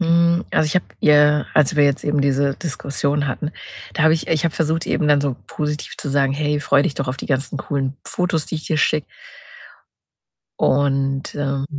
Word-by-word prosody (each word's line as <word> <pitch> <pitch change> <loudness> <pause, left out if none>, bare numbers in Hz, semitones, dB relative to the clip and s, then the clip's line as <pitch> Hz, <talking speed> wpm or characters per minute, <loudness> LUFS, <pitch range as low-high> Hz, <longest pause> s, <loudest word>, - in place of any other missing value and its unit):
Hm, 170 +1 +3
also, - - +2
ich 150 - -2
habe 180 - 0
ihr, 150 0 +4
als 150 -1 +3
wir 145 - +5
jetzt 140 0 +1
eben 145 -1 +1
diese 140 0 +1
Diskussion 145 -2 -2
hatten 150 +4 -3 0.4
da 165 - -1
habe 160 0 +5
ich 160 - -3
ich 160 -1 +1
habe 165 - 0
versucht, 160 +1 -1
eben 150 - 0
dann 145 -1 +4
so 140 -3 -2
positiv 150 0 -4
zu - - -4
sagen: 135 -1 +2
„Hey, 150 +1 0
freu 145 -1 +3
dich 145 -2 -1
doch 135 - -3
auf 130 +1 -4
die - - -6
ganzen 135 0 -1
coolen 135 -1 -3
Fotos, 180 -4 -1
die - - -5
ich 155 - -5
dir 155 - 0
schicke.“ 150 0 +1 1.5
Und, 135 0 +1
ähm 140 -1 -2
145 Hz, 200 wpm, -20 LUFS, 140-155 Hz, 1.5 s, wir